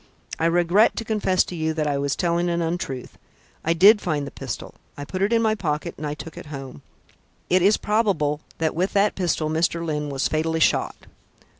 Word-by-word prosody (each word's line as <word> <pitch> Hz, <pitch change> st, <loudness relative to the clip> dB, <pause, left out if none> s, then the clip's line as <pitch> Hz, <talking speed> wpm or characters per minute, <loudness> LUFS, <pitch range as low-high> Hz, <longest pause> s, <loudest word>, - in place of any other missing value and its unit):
I 165 Hz, -, +2 dB
regret 175 Hz, +5 st, +3 dB
to 225 Hz, -, -4 dB
confess 205 Hz, -4 st, +2 dB
to 180 Hz, -, -8 dB
you 160 Hz, -1 st, -1 dB
that 155 Hz, -1 st, 0 dB
I 145 Hz, -1 st, 0 dB
was 140 Hz, -1 st, -1 dB
telling 175 Hz, 0 st, 0 dB
an 170 Hz, 0 st, 0 dB
untruth. 165 Hz, -6 st, -4 dB, 0.4 s
I 165 Hz, -, +2 dB
did 205 Hz, +5 st, +6 dB
find 150 Hz, -6 st, -1 dB
the 140 Hz, -, -8 dB
pistol; -, -, -6 dB, 0.2 s
I 145 Hz, -, -6 dB
put 185 Hz, +4 st, -5 dB
it 200 Hz, +3 st, +2 dB
in 230 Hz, -1 st, +3 dB
my 220 Hz, -1 st, +3 dB
pocket 155 Hz, -8 st, -2 dB
and 150 Hz, -, -5 dB
I 145 Hz, -, -3 dB
took 165 Hz, +1 st, -10 dB
it -, -, -11 dB
home. 135 Hz, -, -8 dB, 0.7 s
It 185 Hz, 0 st, +4 dB
is 200 Hz, +4 st, +4 dB
probable 185 Hz, -9 st, 0 dB, 0.2 s
that 160 Hz, -1 st, 0 dB
with 180 Hz, +4 st, -1 dB
that 205 Hz, +1 st, +3 dB
pistol 170 Hz, -4 st, -1 dB
Mr. 165 Hz, +2 st, 0 dB
Lyne 150 Hz, -2 st, -2 dB
was 135 Hz, -1 st, 0 dB
fatally 160 Hz, +1 st, -1 dB
shot." -, -, +1 dB
165 Hz, 205 wpm, -23 LUFS, 150-185 Hz, 0.7 s, did